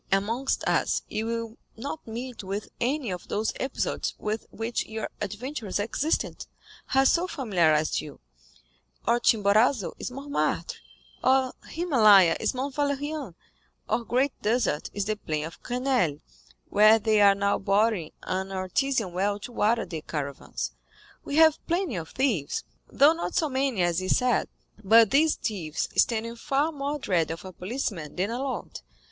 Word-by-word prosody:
Amongst 225 +7 0
us - - +1
you 220 +1 -2
will 230 0 -4 0.2
not 280 +5 -6
meet 235 0 -6
with 195 +2 -4
any 255 -2 -1
of 180 -1 -6
those 215 +1 -1
episodes 265 0 -2
with 215 +1 -3
which 225 +2 -3
your 220 0 -4
adventurous 215 +1 -4
existence 235 +9 -1 0.4
has 270 0 +4
so 350 +2 +1
familiarized 170 - +1
you; 150 - -10 0.9
our 235 +1 +3
Chimborazo 215 0 +3
is - - -4
Mortmartre, 280 +3 -2 0.5
our 260 0 +3
Himalaya 215 - +5
is - - -1
Mount 270 +2 -3
Valérien, 285 - -2 0.5
our 235 - 0
Great 260 +4 +1
Desert 215 -9 0
is 205 -1 -2
the 215 0 -1
plain 155 -6 -3
of 165 - -10
Grenelle, 245 - 0 0.5
where 215 +2 +6
they 215 -1 +2
are 200 -1 +7
now 200 0 +1
boring 200 -4 +1
an 190 +1 -3
artesian 195 +2 -1
well 200 +3 0
to 210 - -9
water 230 0 +1
the 165 -3 -6
caravans. 140 - -4 0.5
We 285 - -4
have 315 -1 +5
plenty 345 -4 0
of 160 -1 -6
thieves, 230 - -1 0.3
though 290 +3 +5
not 340 +2 -4
so 320 -4 +2
many 260 -7 0
as 175 0 +1
is 185 - +2
said; 250 -1 +1 0.4
but 225 +2 +6
these 300 +3 +4
thieves 170 -9 -3
stand 225 -1 +2
in 230 +1 -7
far 280 +6 0
more 285 0 -3
dread 180 - 0
of 165 +3 -6
a 185 - -8
policeman 180 - -4
than 195 +5 -1
a 240 - -3
lord. 260 - -4
225 Hz, 155 wpm, -27 LUFS, 190-265 Hz, 0.9 s, are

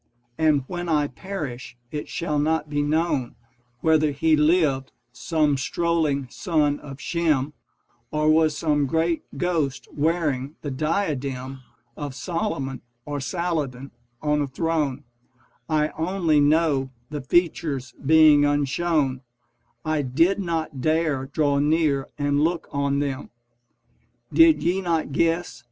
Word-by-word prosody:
And 150 -1 +2
when 175 +2 -5
I 150 -2 +2
perish 145 -9 -6
it 150 -1 -5
shall 150 -4 -1
not 155 0 0
be 145 0 +1
known 145 -4 0 0.5
Whether 155 -1 +3
he 155 +3 +2
lived, 150 -4 +2 0.2
some 150 +2 +1
strolling 155 -1 0
son 150 -4 0
of 140 -1 -10
Shem, 155 -5 0 0.6
Or 150 0 0
was 155 -1 +4
some 145 -3 +1
great 165 +3 +1 0.2
ghost 160 -7 -1
wearing 150 -3 0
the 145 - -3
diadem 135 -4 -2 0.3
Of 145 -3 -6
Solomon 140 - -3 0.2
or 145 -1 -3
Saladin 145 -4 -3 0.3
on 150 0 +2
a 145 - -1
throne: 145 -1 -1 0.7
I 155 -1 +2
only 165 -2 +1
know, 145 -2 +2 0.2
the 150 -1 -4
features 140 -4 0
being 155 0 +6
unshown, 145 -1 +1 0.6
I 155 -1 +1
did 165 +10 +2
not 160 -6 -3
dare 155 -3 +1
draw 145 -1 +1
near 150 -2 +2
and 145 0 +1
look 170 +2 0
on 140 -1 0
them. 140 -1 -3 1.0
Did 330 -1 +6
ye 180 +3 +1
not 165 -5 -1
guess 165 +4 0
150 Hz, 125 wpm, -24 LUFS, 140-165 Hz, 1.0 s, being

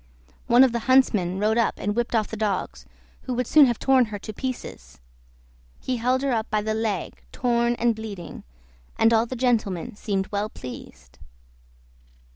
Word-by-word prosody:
One 240 +2 +6
of 260 - +4
the 235 - -1
huntsmen 210 -9 +3
rode 215 +3 +1
up 230 - +1
and 205 +1 -2
whipped 240 0 -1
off 215 -2 +1
the - - -5
dogs, 210 -3 -3 0.4
who 255 - -3
would 250 +1 -1
soon 295 +3 +6
have 240 -2 0
torn 265 -2 +3
her 215 -2 -6
to 215 +2 -8
pieces. 255 - -7 0.8
He 255 - -3
held 255 +3 0
her 275 - 0
up 225 -2 -1
by 215 -1 0
the 215 0 -1
leg 215 -5 -3
torn 235 -1 +1
and 235 -1 +1
bleeding, 205 -6 -8 0.5
and 225 +1 +4
all 225 +1 +3
the 255 - -5
gentlemen 225 -8 -1
seemed 195 -2 -3
well 205 +1 -2
pleased. 65 - -11
225 Hz, 175 wpm, -24 LUFS, 205-245 Hz, 0.8 s, One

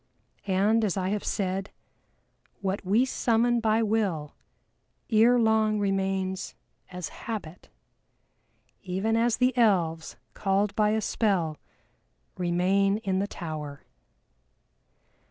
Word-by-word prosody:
And 205 +4 +2
as 200 -3 0
I 185 0 -1
have 205 0 -2
said, 195 0 -2 0.9
what 195 0 -2
we 210 +7 +3
summon 240 -1 +1
by 225 0 +2
Will 200 -9 -1 0.8
ere 230 +3 +5
long 220 -2 +2
remains 190 -1 -1 0.4
as 180 -4 -5
Habit, 195 -7 -7 1.1
even 195 +4 -1
as 230 0 +2
the 250 0 +2
Elves, 175 -9 +1 0.2
called 200 +1 0
by 210 -1 +3
a 220 +1 +1
spell, 185 -9 0 0.8
remain 185 +3 +1
in 190 -1 0
the 200 - -1
Tower. 155 -6 -7
200 Hz, 105 wpm, -27 LUFS, 185-220 Hz, 1.1 s, ere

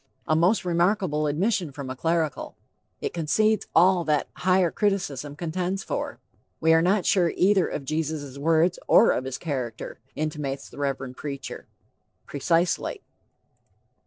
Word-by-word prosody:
A 155 - +3
most 180 +6 +2
remarkable 175 -3 +1
admission 175 +2 0
from 135 -1 -6
a - - -5
clerical! 160 +2 -1 0.5
It - - -3
concedes 215 +7 +1
all 180 +1 +5
that 150 -2 +1
higher 185 -2 +2
criticism 150 - -1
contends 180 +5 -3
for. - - -4 0.4
We 160 0 +4
are 165 - +5
not 185 +2 +2
sure 175 -3 +3
either 190 -1 +3
of 140 - -5
Jesus' 155 -2 -3
words 165 +3 +2
or 230 - +6
of 130 - -1
his 130 -1 -4
character, 130 -8 -5 0.2
intimates 150 -3 -3
the - - -11
Reverend 135 -2 -3
preacher. 140 -2 -6 0.6
Precisely. 165 +5 0
160 Hz, 135 wpm, -25 LUFS, 145-180 Hz, 0.6 s, or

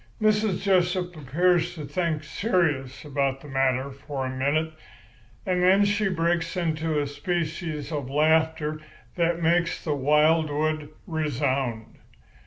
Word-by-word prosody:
Mrs. 215 -3 +1
Jessup 180 -2 +1
appears 175 +4 +1
to 155 -3 -6
think 155 +1 -1
serious 155 - -1
about 140 -2 -1
the - - -11
matter 135 0 0
for 140 0 -5
a 130 0 -4
minute, 155 +4 0 0.7
and 180 -1 +1
then 190 +3 +5
she 205 0 +1
breaks 170 0 0
into 160 -2 0
a 145 - 0
species 160 0 -3
of 145 -4 -3
laughter 155 +1 +1 0.3
that 170 -1 0
makes 170 +1 +1
the 155 - 0
wildwood 150 +1 +2 0.2
resound. 135 - -2
155 Hz, 125 wpm, -25 LUFS, 145-175 Hz, 0.7 s, then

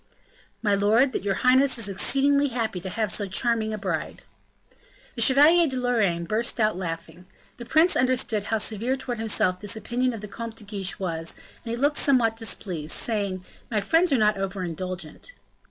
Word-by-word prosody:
"My 205 -2 +2
lord, 220 +7 +3
that - - -2
your 200 -1 0
highness 260 +3 +3
is 225 -3 0
exceedingly 275 +8 +2
happy 225 -7 -2
to 190 - -5
have 215 +1 -1
so 205 - 0
charming 220 +2 0
a 215 - -3
bride." 195 - -4 0.9
The 235 - -5
Chevalier 300 +8 +5
de 260 -2 -4
Lorraine 215 -9 +1
burst 225 +6 -1
out 215 -3 +2
laughing. 170 0 -6 0.3
The 240 -2 -9
prince 320 +7 +4
understood 250 -5 0
how 220 - 0
severe 225 +5 0
towards 245 -3 -5
himself 195 -4 0
this 205 +3 -1
opinion 245 +3 -1
of 225 - -7
the 210 - -7
Comte 230 +2 -7
de 225 - -7
Guiche 200 -2 -4
was, 165 -3 -4 0.3
and 230 - -7
he 230 - -1
looked 290 +4 +1
somewhat 240 -5 +3
displeased, 185 -8 -3
saying, 200 -5 -1 0.2
"My 220 - 0
friends 330 - +2
are 270 - +4
not 210 -2 +2
over 195 -1 -3
indulgent." 180 - -6
220 Hz, 185 wpm, -25 LUFS, 195-250 Hz, 0.9 s, Chevalier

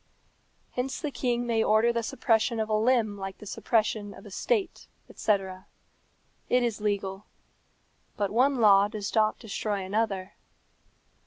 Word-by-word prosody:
Hence 255 +1 -3
the 300 - -3
king 245 -2 -1
may 225 -2 +1
order 220 +2 +3
the 235 - 0
suppression 230 -2 +1
of 220 0 -1
a - - 0
limb 220 -2 +2
like 195 0 -6
the - - -12
suppression 210 -1 -1
of - - -14
a 205 - -11
state, 425 - -1 0.2
etc. 190 -3 -1 0.8
It 250 0 +3
is 230 -3 -2
legal. 200 -1 -2 0.9
But 200 -2 -1
one 260 +5 +3
law 205 -4 +6
does 210 -1 -5
not 215 -1 +2
destroy 205 -2 -3
another. 195 -1 -2
215 Hz, 145 wpm, -28 LUFS, 200-235 Hz, 0.9 s, law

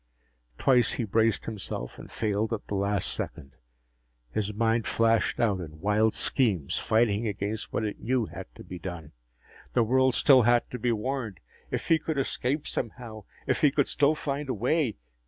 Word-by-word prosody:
Twice 125 -4 +3
he 120 - -2
braced 110 +1 +1
himself 100 - -5
and - - -11
failed 110 +1 -1
at 110 - -4
the - - -6
last 100 -1 +1
second. 70 - -5 0.8
His 105 +6 -1
mind 115 +1 +1
flashed 115 -1 +2
out 105 -5 +2
in 75 -2 -9
wild 105 +4 +2
schemes, 100 - +1
fighting 110 0 +2
against 105 +1 -3
what 110 - -1
it 105 - -4
knew 125 -1 0
had - - -8
to - - -11
be 90 - -8
done. 85 -3 -7 0.6
The 120 - +4
world 130 +2 +3
still 135 -3 +6
had 120 +1 +3
to 125 - -5
be 120 +2 +1
warned! 115 -2 -3 0.3
If - - -3
he 165 -1 +5
could 155 -1 -3
escape, 135 +2 -1
somehow... 115 -3 -5 0.2
if - - 0
he 150 - +6
could 140 0 +1
still 145 +2 +2
find 145 -1 -3
a 130 - 0
way.... 125 +2 0
115 Hz, 175 wpm, -27 LUFS, 105-130 Hz, 0.8 s, still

